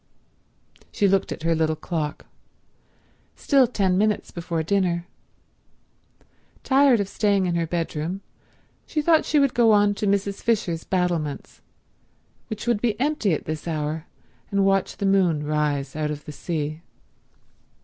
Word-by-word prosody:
She 205 Hz, -, +2 dB
looked 195 Hz, 0 st, +1 dB
at -, -, -6 dB
her 165 Hz, 0 st, +2 dB
little 160 Hz, -1 st, +1 dB
clock. 155 Hz, -2 st, -4 dB, 1.1 s
Still 275 Hz, -3 st, +3 dB
ten 195 Hz, -5 st, +1 dB
minutes 210 Hz, 0 st, 0 dB
before 170 Hz, -1 st, -3 dB
dinner. 175 Hz, -1 st, 0 dB, 1.6 s
Tired 270 Hz, -3 st, +4 dB
of 200 Hz, -, -1 dB
staying 200 Hz, -2 st, +1 dB
in 175 Hz, -, 0 dB
her 170 Hz, -1 st, 0 dB
bedroom 165 Hz, +2 st, -3 dB, 0.7 s
she 310 Hz, -, -2 dB
thought 320 Hz, 0 st, +4 dB
she 305 Hz, -, +1 dB
would 275 Hz, -3 st, +3 dB
go 235 Hz, -2 st, +4 dB
on 205 Hz, 0 st, +4 dB
to 205 Hz, +1 st, -2 dB
Mrs. 200 Hz, 0 st, 0 dB
Fisher's 190 Hz, -8 st, 0 dB
battlements, 175 Hz, -6 st, -2 dB, 0.9 s
which 220 Hz, -2 st, -6 dB
would 235 Hz, -4 st, +1 dB
be 225 Hz, -3 st, 0 dB
empty 275 Hz, -7 st, +1 dB
at -, -, -7 dB
this 155 Hz, +1 st, -5 dB
hour, 155 Hz, 0 st, -3 dB, 0.4 s
and 200 Hz, -1 st, +2 dB
watch 195 Hz, -1 st, +1 dB
the 200 Hz, -, -2 dB
moon 180 Hz, -6 st, +2 dB
rise 145 Hz, -2 st, -1 dB
out 155 Hz, -1 st, -1 dB
of 150 Hz, -1 st, -6 dB
the -, -, -7 dB
sea. 155 Hz, 0 st, -4 dB
185 Hz, 145 wpm, -24 LUFS, 160-205 Hz, 1.6 s, Tired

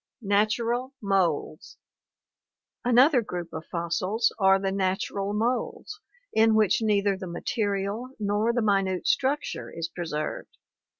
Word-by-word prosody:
Natural 230 Hz, +6 st, 0 dB
Moulds. 185 Hz, -6 st, -1 dB, 0.6 s
— -, -, -65 dB, 0.3 s
Another 250 Hz, +3 st, +5 dB
group 175 Hz, -5 st, -6 dB
of 160 Hz, 0 st, -7 dB
fossils 185 Hz, +6 st, 0 dB
are 195 Hz, -1 st, +5 dB
the 195 Hz, 0 st, -1 dB
natural 195 Hz, +1 st, -1 dB
moulds 245 Hz, -, -2 dB, 0.3 s
in 220 Hz, 0 st, +4 dB
which 215 Hz, 0 st, +3 dB
neither 205 Hz, -2 st, +2 dB
the 190 Hz, -1 st, -7 dB
material 200 Hz, +4 st, -2 dB
nor 210 Hz, +2 st, +1 dB
the 240 Hz, -1 st, 0 dB
minute 195 Hz, -3 st, +1 dB
structure 280 Hz, +3 st, 0 dB
is 165 Hz, 0 st, -5 dB
preserved. 160 Hz, -4 st, -5 dB
200 Hz, 120 wpm, -26 LUFS, 190-230 Hz, 0.6 s, Another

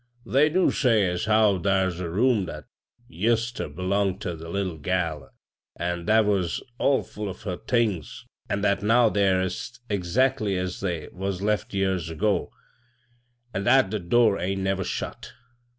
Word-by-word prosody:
'They 145 Hz, +3 st, +3 dB
do 180 Hz, +4 st, +3 dB
say 115 Hz, -7 st, +3 dB
as 90 Hz, +1 st, -2 dB
how 105 Hz, -3 st, +4 dB
thar's 95 Hz, -2 st, +1 dB
a 90 Hz, -2 st, -3 dB
room 110 Hz, +2 st, +2 dB
that 75 Hz, -3 st, -8 dB, 0.4 s
ised 115 Hz, +6 st, 0 dB
ter -, -, -3 dB
belong 95 Hz, +4 st, 0 dB
ter 90 Hz, -3 st, -4 dB
the 80 Hz, +1 st, -9 dB
little 95 Hz, -3 st, -3 dB
gal, 80 Hz, -4 st, -2 dB, 0.5 s
an' 85 Hz, 0 st, -3 dB
that 110 Hz, +2 st, +4 dB
was 95 Hz, -5 st, 0 dB, 0.2 s
ill 140 Hz, -1 st, +3 dB
full 105 Hz, -1 st, -6 dB
of 95 Hz, -, -9 dB
her 90 Hz, -4 st, -3 dB
things; 110 Hz, -, -1 dB, 0.2 s
an' 100 Hz, 0 st, -1 dB
ttiat 100 Hz, -1 st, +2 dB
now 115 Hz, +2 st, +4 dB
they're 100 Hz, -3 st, +2 dB
est 105 Hz, +6 st, -5 dB
exactly 105 Hz, +2 st, +1 dB
as 90 Hz, 0 st, -3 dB
they 85 Hz, -5 st, -3 dB
was 95 Hz, 0 st, -4 dB
left 105 Hz, 0 st, 0 dB
years 95 Hz, -4 st, 0 dB
ago, 100 Hz, +6 st, 0 dB, 1.0 s
an' 95 Hz, +1 st, -2 dB
hat 120 Hz, -5 st, +5 dB
the 105 Hz, -, -1 dB
door 105 Hz, +3 st, +3 dB
ain't 95 Hz, +2 st, -2 dB
never 95 Hz, 0 st, 0 dB
shut. -, -, -5 dB
95 Hz, 165 wpm, -25 LUFS, 90-110 Hz, 1.0 s, hat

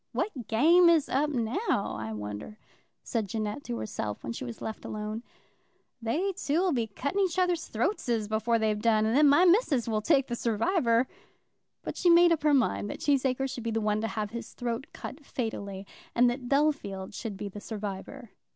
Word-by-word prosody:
"What 265 Hz, -, -3 dB
game 335 Hz, +10 st, +6 dB
is 325 Hz, -4 st, +4 dB
up 290 Hz, +3 st, +1 dB
now, 245 Hz, -, -1 dB
I 110 Hz, +1 st, -5 dB
wonder," 105 Hz, -, -6 dB, 0.5 s
said 225 Hz, -4 st, -2 dB
Jeannette 215 Hz, +5 st, -3 dB
to 120 Hz, -, -3 dB
herself, 105 Hz, -1 st, -4 dB
when 115 Hz, -, -4 dB
she -, -, -6 dB
was 120 Hz, -2 st, -7 dB
left 220 Hz, -, -6 dB
alone. 215 Hz, +1 st, -4 dB, 0.8 s
"They 315 Hz, -, 0 dB
two'll 350 Hz, +2 st, +1 dB
be 235 Hz, -6 st, 0 dB
cutting 280 Hz, -, -3 dB
each 375 Hz, -3 st, +1 dB
other's 360 Hz, -2 st, +1 dB
throatses 235 Hz, -, -1 dB
before 220 Hz, +2 st, +1 dB
they've 215 Hz, -1 st, 0 dB
done, 220 Hz, -1 st, +3 dB
and 220 Hz, +2 st, +1 dB
then 295 Hz, +1 st, +6 dB
my 335 Hz, +6 st, +6 dB
missus 340 Hz, -, +3 dB
will 215 Hz, -2 st, 0 dB
take 275 Hz, +2 st, +3 dB
the 240 Hz, -, -3 dB
surwiver." 235 Hz, -, +2 dB, 0.8 s
But -, -, -5 dB
she 355 Hz, -, +3 dB
made 345 Hz, 0 st, +7 dB
up 330 Hz, -, +2 dB
her 300 Hz, 0 st, +3 dB
mind 100 Hz, -, +1 dB
that -, -, -5 dB
Cheesacre 270 Hz, -2 st, +1 dB
should 255 Hz, -2 st, -6 dB
be 230 Hz, -, -2 dB
the 225 Hz, 0 st, 0 dB
one 210 Hz, 0 st, 0 dB
to 225 Hz, -, -1 dB
have 210 Hz, 0 st, -3 dB
his 235 Hz, 0 st, -7 dB
throat 245 Hz, +3 st, -3 dB
cut 290 Hz, +2 st, -8 dB
fatally, 200 Hz, -7 st, -4 dB, 0.3 s
and 245 Hz, +1 st, +5 dB
that 245 Hz, 0 st, -6 dB
Bellfield 275 Hz, -10 st, 0 dB
should 205 Hz, -1 st, -5 dB
be 205 Hz, -, -5 dB
the 205 Hz, +1 st, -8 dB
survivor. 210 Hz, +4 st, -6 dB
235 Hz, 190 wpm, -29 LUFS, 210-290 Hz, 0.8 s, made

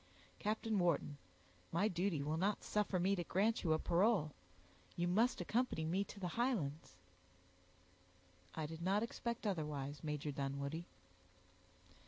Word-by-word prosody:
Captain 215 Hz, 0 st, 0 dB
Wharton, 165 Hz, -4 st, +1 dB, 0.5 s
my 190 Hz, +6 st, +3 dB
duty 175 Hz, -5 st, 0 dB
will 150 Hz, +2 st, 0 dB
not 195 Hz, +5 st, +1 dB
suffer 210 Hz, -2 st, +1 dB
me 190 Hz, +3 st, +3 dB
to 175 Hz, -, -2 dB
grant 210 Hz, +7 st, +1 dB
you 165 Hz, -, +2 dB
a 155 Hz, -, +5 dB
parole; 175 Hz, -1 st, +3 dB, 0.6 s
you 175 Hz, 0 st, 0 dB
must 220 Hz, +8 st, +3 dB
accompany 195 Hz, -3 st, 0 dB
me 185 Hz, +5 st, +1 dB
to 200 Hz, -, -10 dB
the 180 Hz, -2 st, -2 dB
Highlands." 170 Hz, -, -1 dB, 1.6 s
"I 155 Hz, -, -2 dB
did 160 Hz, +2 st, -7 dB
not 195 Hz, +5 st, +2 dB
expect 235 Hz, 0 st, -3 dB
otherwise, 150 Hz, -7 st, -2 dB
Major 150 Hz, -1 st, -2 dB
Dunwoodie." 140 Hz, +4 st, -3 dB
175 Hz, 135 wpm, -39 LUFS, 155-210 Hz, 1.6 s, a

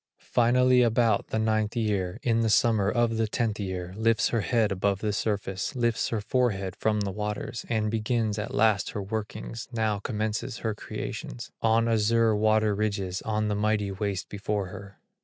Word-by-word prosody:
Finally 125 Hz, +1 st, +5 dB
about 115 Hz, -2 st, +2 dB
the -, -, -2 dB
ninth 110 Hz, 0 st, +1 dB
year, 100 Hz, -6 st, -1 dB
In 115 Hz, -2 st, +2 dB
the 115 Hz, -1 st, +2 dB
summer 110 Hz, -2 st, +3 dB
of 115 Hz, 0 st, +1 dB
the 110 Hz, 0 st, +1 dB
tenth 110 Hz, -1 st, -1 dB
year, 95 Hz, -2 st, -4 dB
Lifts 110 Hz, +1 st, +2 dB
her 115 Hz, -, +1 dB
head 110 Hz, +3 st, +1 dB
above 100 Hz, +1 st, +1 dB
the 105 Hz, +1 st, -2 dB
surface, 100 Hz, +1 st, -2 dB
Lifts 120 Hz, -3 st, +1 dB
her 110 Hz, -3 st, -1 dB
forehead 100 Hz, -5 st, 0 dB
from 105 Hz, -1 st, +1 dB
the 100 Hz, -1 st, -2 dB
waters, 105 Hz, +3 st, -4 dB
And 110 Hz, -2 st, 0 dB
begins 110 Hz, -1 st, 0 dB
at 105 Hz, -, -4 dB
last 110 Hz, -2 st, +2 dB
her 105 Hz, -, -3 dB
workings, 110 Hz, +3 st, -5 dB
Now 110 Hz, -3 st, 0 dB
commences 110 Hz, +3 st, -3 dB
her 110 Hz, -, +1 dB
creations, -, -, -6 dB
On 115 Hz, 0 st, +3 dB
the 115 Hz, -, +1 dB
azure 115 Hz, 0 st, +3 dB
water 110 Hz, 0 st, +3 dB
ridges, 100 Hz, -3 st, -2 dB
On 110 Hz, -1 st, 0 dB
the 105 Hz, -, 0 dB
mighty 105 Hz, -1 st, 0 dB
waste 100 Hz, -1 st, -3 dB
before 100 Hz, -1 st, -3 dB
her. 100 Hz, +1 st, -10 dB
110 Hz, 175 wpm, -27 LUFS, 100-115 Hz, -, Finally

